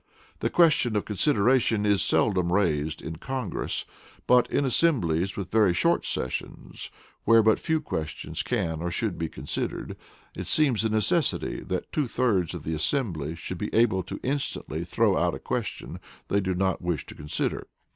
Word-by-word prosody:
The - - 0
question 155 -9 +3
of 105 - 0
consideration 115 -1 +2
is 100 -2 +3
seldom 90 -5 +2
raised 80 -5 0
in 80 0 -6
Congress, 130 - -3 0.4
but 125 -1 +4
in 140 - +1
assemblies 100 - +2
with 95 -2 -5
very 105 -5 +4
short - - +2
sessions, 65 - -4 0.3
where 115 0 +5
but 110 0 +4
few 160 -1 0
questions 80 - -4
can 80 -1 -2
or 85 - -2
should 90 +1 -2
be 80 -1 -2
considered, - - -4 0.4
it - - -5
seems 135 -8 +2
a 110 - +1
necessity 110 - +1
that 95 -1 -4
two 150 -4 0
thirds 105 -10 0
of - - -7
the 80 - -3
assembly 80 - -1
should 85 +1 -6
be 105 - -3
able 110 -5 +3
to 90 - -7
instantly 140 +2 -2
throw - - +2
out - - +1
a - - -8
question - - -4 0.3
they 100 - +2
do 95 -2 -1
not 95 +1 0
wish 85 -5 -2
to - - -10
consider. 75 0 -2
100 Hz, 165 wpm, -26 LUFS, 85-125 Hz, 0.4 s, where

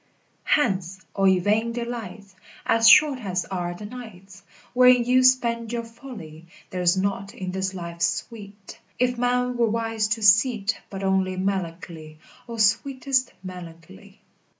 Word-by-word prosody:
3. 295 - +3
Hence, 190 -4 -4
all 195 -1 +2
ye 190 -1 +5
vain 215 +5 0
delights, 225 -5 -7 0.3
As 225 0 +5
short 280 +2 +6
as 180 -3 -2
are 175 -1 -4
the 210 - -9
nights 200 -5 -11 0.3
Wherein 250 -1 +6
you 255 +1 +4
spend 235 -3 +2
your 235 -1 -3
folly! 210 - -11 0.2
There's 180 0 +1
naught 195 +1 -2
in 185 -1 -5
this 190 0 -3
life 170 -1 -7
sweet, 205 -2 -4 0.2
If 250 -1 0
man 250 0 0
were 235 -1 +2
wise 225 -1 -1
to 220 - -8
see't 220 0 +4
But 195 0 -7
only 190 -1 0
melancholy, 170 -4 -4 0.3
O, 230 - -6
sweetest 255 +4 +1
melancholy! 170 - -11
205 Hz, 145 wpm, -24 LUFS, 185-235 Hz, 0.3 s, short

